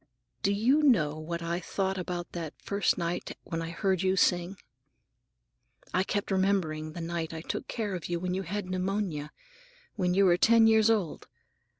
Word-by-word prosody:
Do 200 - +2
you 240 +9 +3
know 155 - +3
what 170 +2 -4
I 170 +1 -1
thought 190 +1 -2
about 175 -1 -4
that 165 -3 -5
first 200 0 0
night 170 -1 -3
when 165 -2 -4
I 165 - -4
heard 190 +1 0
you 190 0 +2
sing? 180 0 +2 1.4
I 185 - +3
kept 205 +1 -2
remembering 180 -5 0
the 170 - -6
night 165 -1 -3
I 160 - -5
took - - -4
care 215 -4 -3
of 175 -2 -5
you 175 -1 -1
when 180 +1 -2
you 190 - -1
had 195 +2 -4
pneumonia, 185 -5 -2 0.7
when 180 -2 +1
you 200 +1 +5
were 175 -1 +5
ten 230 +3 +6
years 220 0 +5
old. 205 -8 0
185 Hz, 180 wpm, -29 LUFS, 170-200 Hz, 1.4 s, ten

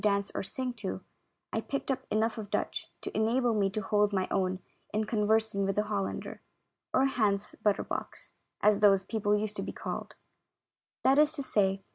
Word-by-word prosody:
dance 200 -1 +1
or - - 0
sing 255 +5 -3
to, 215 -5 -4 0.5
I - - +1
picked 275 0 -2
up 265 - -2
enough 220 +2 +1
of 205 -2 -6
Dutch - - -2 0.2
to - - -5
enable 235 +2 +2
me 200 -2 +2
to 215 +2 -3
hold 210 +1 +2
my 190 -2 0
own 185 -1 +1 0.3
in 215 +1 +1
con 210 -1 0
versing 220 -2 +2
with 195 0 0
a 210 - +3
Hollander, 205 -2 -3 0.5
or 265 - +4
Hans 210 -6 +1
Butter 210 -2 +3
box, - - -6 0.3
as 210 -1 +5
those 195 -2 +5
people 210 0 +1
used 210 0 -3
to - - -1
be - - -4
called; - - -5 0.9
that 270 +2 +5
is 300 0 +5
to 280 - -4
say. 195 -5 +1
210 Hz, 190 wpm, -30 LUFS, 200-225 Hz, 0.9 s, as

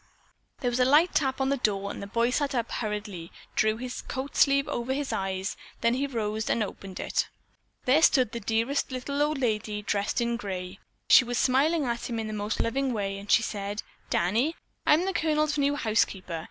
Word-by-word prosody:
There 245 - +1
was 240 - -1
a - - +6
light 295 +7 +5
tap 265 -3 +1
on 265 0 +1
the 280 - +1
door 200 -4 0
and - - -7
the 200 - -6
boy 230 +3 +1
sat 280 +1 0
up 235 -2 +1
and - - -4
hurriedly 210 -6 -4 0.2
drew 215 0 +2
his 250 +1 -5
coat 265 +2 -5
sleeve 275 0 +4
over 240 +2 -2
his 280 0 -2
eyes. 190 0 -2 0.3
Then 235 - +3
he 275 +3 0
rose 220 -4 -2
and 225 - +2
opened 195 -2 -7
it. - - -1 0.6
There 275 +5 +5
stood 255 -8 +4
the 235 - -4
dearest 230 +7 0
little 280 +3 -2
old 300 0 +1
lady, 215 -4 -1
dressed 205 +2 0
in 235 0 0
gray. 190 -3 -5 0.3
She - - +8
was 245 0 -3
smiling 285 +6 +3
at 235 0 -2
him 235 - -2
in 220 -1 -3
a - - -5
most 210 +1 -2
loving 265 +2 0
way 195 -2 -2
and 200 0 -11
she 230 - +5
said: 205 -1 -4 0.3
"Danny, 230 - +1 0.3
I'm 320 +4 +5
the 385 - -1
Colonel's 305 -2 +1
new 285 0 +2
housekeeper. 200 - 0
235 Hz, 205 wpm, -27 LUFS, 210-275 Hz, 0.6 s, She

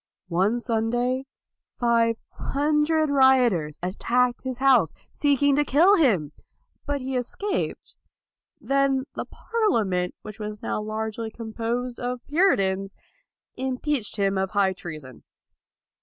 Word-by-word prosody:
One 195 +7 +1
Sunday, 240 +3 -1 0.5
five 230 -1 +3 0.2
hundred 300 +2 +1
rioters 250 - +3
attacked 240 +7 0
his 260 -2 -4
house, 255 - +4 0.2
seeking 285 -1 +2
to 295 - +4
kill 335 +9 +5
him, 195 - +2 0.6
but 285 -1 -1
he 260 +1 -3
escaped. 380 - -3 0.6
Then 275 -1 +1
the - - -4
Parlia 430 - 0
ment, 180 -1 -1
which 215 0 -9
was 210 0 -6
now - - -2
largely 220 +1 -4
composed 235 +2 -4
of 245 0 -4
Puritans, 195 - +1 0.6
impeached 260 -1 -2
him 195 -1 +1
of 190 0 -1
high 195 -1 +2
treason. 155 -8 -9
240 Hz, 115 wpm, -25 LUFS, 205-275 Hz, 0.6 s, kill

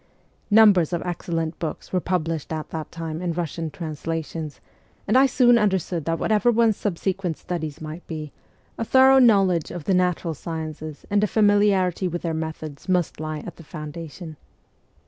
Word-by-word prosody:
Numbers 205 -6 +6
of 170 - -1
excellent 165 -2 -3
books 160 +2 -5
were 185 - +3
published 165 -4 -2
at 155 -1 -4
that 160 -1 -5
time 165 -1 -5
in 175 -2 -1
Russian 165 -1 -3
translations, 160 0 -5 0.5
and - - +2
I 265 +1 +7
soon 245 -2 +5
understood 190 -6 0
that 165 0 0
whatever 215 +5 +2
one's 230 -2 +3
subsequent 185 -3 -2
studies 160 -5 -5
might 155 +2 -8
be, 155 -3 -6 0.5
a - - 0
thorough 265 +3 +6
knowledge 195 - +4
of 175 - -6
the 190 - +1
natural 180 -2 +1
sciences 155 -1 -6
and 205 0 +2
familiarity 205 -4 +3
with 175 0 -4
their 165 -2 -1
methods 160 0 -6
must 180 -5 +1
lie 155 -1 -4
at 175 - -8
the 170 - -12
foun 150 -1 -7
dation. 165 0 -9
170 Hz, 165 wpm, -24 LUFS, 160-195 Hz, 0.5 s, I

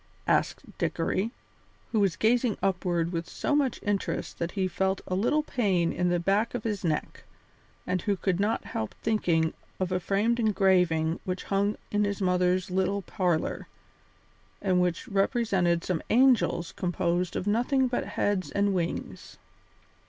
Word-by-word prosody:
asked - - +1 0.2
Dickory, 205 +4 0 0.6
who 220 - +2
was 195 -4 +2
gazing 235 -1 +2
upward 175 -3 0
with 170 -1 -3
so 290 - -1
much 275 -4 +1
interest 205 -1 -2
that 170 0 -2
he 190 -2 0
felt 190 +1 0
a - - -4
little 245 +11 +2
pain 195 - +1
in 180 +1 0
the 175 0 +1
back 200 +7 +1
of - - -3
his 210 -4 -2
neck, 155 -3 -2 0.6
and 180 -1 -1
who 205 - 0
could 185 -1 0
not 210 +3 0
help 110 - -4
thinking 170 -7 +1 0.3
of 185 -1 -1
a 185 - +1
framed 210 +6 +1
engraving 180 -7 +2
which 185 0 -3
hung 200 +1 0
in 210 0 +2
his 200 -1 -1
mother's 180 0 +1
little 190 +2 0
parlour, 180 -6 -1 0.9
and 185 -2 +2
which 180 +5 -1
represented 195 -5 +1
some 180 -4 -1
angels 240 -8 +3
composed 175 0 -1
of - - -2
nothing 245 +5 +2
but 245 - -2
heads 200 -2 -1
and 200 0 +1
wings. 175 -2 -4
190 Hz, 150 wpm, -28 LUFS, 180-210 Hz, 0.9 s, angels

